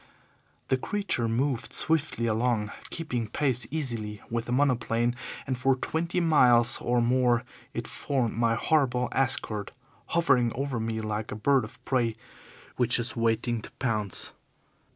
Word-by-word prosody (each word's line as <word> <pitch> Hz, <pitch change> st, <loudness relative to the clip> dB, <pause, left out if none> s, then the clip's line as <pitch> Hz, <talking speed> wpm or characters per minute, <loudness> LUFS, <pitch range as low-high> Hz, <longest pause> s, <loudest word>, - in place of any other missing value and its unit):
The 130 Hz, -, +3 dB
creature 195 Hz, -, -1 dB
moved 120 Hz, 0 st, -1 dB
swiftly 155 Hz, -7 st, +1 dB
along, 110 Hz, -2 st, +1 dB, 0.2 s
keeping 125 Hz, -9 st, -2 dB
pace 125 Hz, 0 st, 0 dB
easily 115 Hz, -8 st, -3 dB
with 115 Hz, 0 st, -1 dB
the -, -, -5 dB
monoplane, 120 Hz, -3 st, +1 dB, 0.3 s
and 130 Hz, -, -1 dB
for 130 Hz, +2 st, +2 dB
twenty 165 Hz, +6 st, -1 dB
miles 125 Hz, -8 st, +5 dB
or 120 Hz, 0 st, +2 dB
more 120 Hz, -1 st, +3 dB, 0.3 s
it -, -, -3 dB
formed 130 Hz, -5 st, -1 dB
my 115 Hz, 0 st, +2 dB
horrible 125 Hz, -2 st, +2 dB
escort, 115 Hz, -6 st, -1 dB, 0.4 s
hovering 140 Hz, -8 st, +3 dB
over 135 Hz, -2 st, -2 dB
me 110 Hz, 0 st, -2 dB
like 110 Hz, 0 st, -3 dB
a -, -, -3 dB
bird 135 Hz, +5 st, +3 dB
of -, -, -11 dB
prey 120 Hz, -4 st, +1 dB, 0.6 s
which 125 Hz, -1 st, +3 dB
is 120 Hz, 0 st, -2 dB
waiting 115 Hz, 0 st, 0 dB
to -, -, -9 dB
pounce. 110 Hz, -7 st, -2 dB
120 Hz, 140 wpm, -28 LUFS, 115-135 Hz, 0.6 s, miles